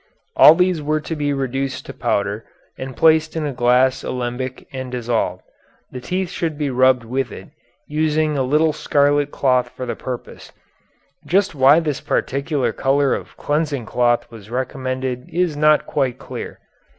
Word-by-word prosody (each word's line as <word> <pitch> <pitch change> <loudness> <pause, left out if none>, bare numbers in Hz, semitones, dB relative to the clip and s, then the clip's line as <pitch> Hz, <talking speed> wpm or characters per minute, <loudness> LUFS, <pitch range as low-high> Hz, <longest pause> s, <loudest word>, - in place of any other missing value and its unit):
All 155 - +9
these 180 -2 +1
were 155 +1 0
to 160 +2 -5
be 145 -1 -1
reduced 135 0 -3
to - - -8
powder 100 +2 -1 0.3
and 130 -1 -7
placed 160 0 +4
in 160 -2 -1
a 145 - -3
glass 125 +2 +2
alembic 125 +1 -4
and 130 -1 -5
dissolved. 120 -2 -2 0.5
The 125 - -7
teeth 180 +7 -2
should 165 -5 -3
be 145 -2 -1
rubbed 130 -1 +3
with 125 +1 -2
it, - - -10 0.4
using 155 0 0
a 135 - 0
little 150 +4 +2
scarlet 145 0 +2
cloth 130 -3 +1
for 130 - -7
the 120 - -3
purpose. 125 -2 -8 0.7
Just 195 +2 +1
why 140 +2 +6
this 150 -4 -3
particular 140 0 -1
color 140 0 +2
of - - -6
cleansing 145 -4 -1
cloth 120 +1 +1
was 110 -3 -12
recommended 130 0 -3
is 175 -2 0
not 150 +1 +3
quite 130 -4 -1
clear. - - -8
135 Hz, 160 wpm, -20 LUFS, 125-150 Hz, 0.7 s, All